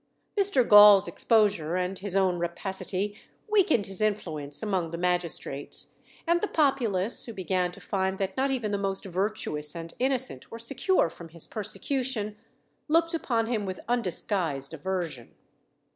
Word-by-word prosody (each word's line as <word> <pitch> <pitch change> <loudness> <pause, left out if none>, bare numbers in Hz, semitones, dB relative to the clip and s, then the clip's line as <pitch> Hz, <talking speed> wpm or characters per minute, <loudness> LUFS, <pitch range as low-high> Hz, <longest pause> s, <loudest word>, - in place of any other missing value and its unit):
Mr. 390 - +3
Gaul's 205 -2 +8
exposure 195 -3 +1
and 185 +1 -2
his 195 -1 -4
own 185 -2 +2
rapacity 190 +3 -3 0.3
weakened 380 - +3
his 195 +1 -5
influence 160 -8 -2
among 190 -6 -1
the 170 - -5
magistrates; 175 -5 -2 0.3
and 345 +1 +2
the 420 - 0
populace, 240 - +3
who 230 - -7
began 185 -2 -1
to - - -13
find 190 -1 -2
that 190 -1 -3
not 270 +1 +1
even 240 -6 -2
the 200 - -1
most 195 0 -3
virtuous 185 -6 -1
and 165 0 -6
innocent 260 - +2
were 230 - -8
secure 275 - +1
from 165 0 -11
his 165 0 -7
persecution, 215 0 -3 0.5
looked 330 +2 +2
upon 235 -8 0
him 225 -2 -2
with 185 -2 -5
undisguised 180 - -1
aversion. 165 -6 -5
195 Hz, 145 wpm, -27 LUFS, 175-230 Hz, 0.5 s, Gaul's